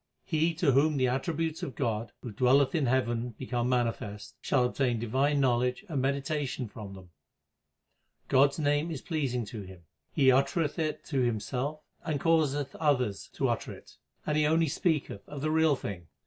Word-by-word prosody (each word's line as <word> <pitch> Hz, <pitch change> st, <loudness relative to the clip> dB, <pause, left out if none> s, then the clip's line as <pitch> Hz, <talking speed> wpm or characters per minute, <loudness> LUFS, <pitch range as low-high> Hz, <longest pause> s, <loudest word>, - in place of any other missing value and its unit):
He 160 Hz, 0 st, +1 dB
to 160 Hz, -4 st, +3 dB
whom 145 Hz, +3 st, +3 dB
the 130 Hz, -1 st, +3 dB
attributes 160 Hz, +5 st, -1 dB
of 130 Hz, -, -5 dB
God, 115 Hz, -4 st, -2 dB
who 120 Hz, -, -5 dB
dwelleth 130 Hz, +5 st, +3 dB
in 155 Hz, -6 st, +1 dB
heaven, 120 Hz, -2 st, 0 dB
become 125 Hz, -1 st, -2 dB
manifest, 115 Hz, -4 st, -2 dB
shall 125 Hz, -, +2 dB
obtain 125 Hz, -1 st, 0 dB
divine 135 Hz, +6 st, +1 dB
knowledge 125 Hz, -, +1 dB
and 145 Hz, -7 st, -1 dB
medita 140 Hz, +2 st, -1 dB
tion 130 Hz, -1 st, -4 dB
from 100 Hz, -2 st, -9 dB
them. 90 Hz, -2 st, -14 dB, 1.2 s
God 135 Hz, +2 st, +5 dB
s -, -, -9 dB
name 145 Hz, +1 st, +1 dB
is 155 Hz, -5 st, -5 dB
pleasing 135 Hz, -8 st, -1 dB
to 105 Hz, 0 st, -7 dB
him; 95 Hz, -3 st, -12 dB, 0.3 s
he 135 Hz, -3 st, +5 dB
uttereth 150 Hz, +5 st, +1 dB
it 155 Hz, -1 st, -2 dB
himself 130 Hz, +3 st, -1 dB, 0.2 s
and 155 Hz, -4 st, -1 dB
causeth 145 Hz, -3 st, +1 dB
others 125 Hz, -10 st, 0 dB
to -, -, 0 dB
utter -, -, -2 dB
it; -, -, -15 dB, 0.3 s
and 150 Hz, -, 0 dB
he 150 Hz, 0 st, +3 dB
only 160 Hz, 0 st, +3 dB
speaketh 150 Hz, -, -1 dB
of 145 Hz, -2 st, -6 dB
the 155 Hz, +1 st, 0 dB
Real 160 Hz, -2 st, +4 dB
Thing. 90 Hz, -9 st, -7 dB
135 Hz, 175 wpm, -29 LUFS, 120-150 Hz, 1.2 s, God